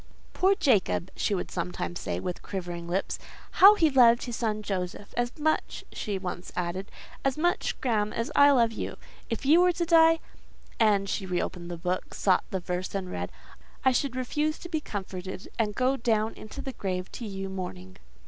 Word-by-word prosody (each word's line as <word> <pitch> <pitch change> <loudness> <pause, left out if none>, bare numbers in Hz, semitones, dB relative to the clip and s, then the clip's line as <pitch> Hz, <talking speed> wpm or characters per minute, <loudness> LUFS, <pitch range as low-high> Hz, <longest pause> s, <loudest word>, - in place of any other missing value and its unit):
"Poor 385 +2 +3
Jacob!" 205 - +2
she - - 0
would - - -4
sometimes 85 -1 -3
say, 85 0 -3
with 180 - -4
quivering 175 -3 -5
lips. 185 +3 -1 0.4
"How 400 +3 +11
he 320 -6 +3
loved 235 -3 +6
his 240 -2 -4
son 215 -2 -1
Joseph! 190 0 -4
As 240 +3 -1
much," 310 +1 0
she 205 -2 -3
once 180 -1 -5
added—"as 190 +9 -4
much, 350 +3 0
Graham, 215 -5 +1
as 230 - -3
I 285 0 +8
love 235 -5 +4
you: 225 - -5 0.3
if 230 +3 -3
you 320 +5 +6
were 360 0 +4
to 345 0 -1
die" 330 -1 +6 0.6
(and 205 -3 +4
she 195 0 -2
re 180 -1 0
opened 175 0 -4
the 175 - -5
book, 180 +2 -3
sought 190 -2 +2
the 190 - -2
verse, 180 +2 -4
and 185 -2 -3
read), - - -4 0.5
"I 260 - +6
should 255 0 0
refuse 300 +5 -1
to 345 - -8
be 315 -3 -1
comforted, 190 -5 -6
and 210 -2 +1
go 260 +1 +2
down 220 -2 +1
into 215 +6 -9
the 265 - -5
grave 185 -3 -3
to 235 - -6
you 195 -1 -4
mourning." 95 - -6
210 Hz, 185 wpm, -28 LUFS, 185-270 Hz, 0.6 s, How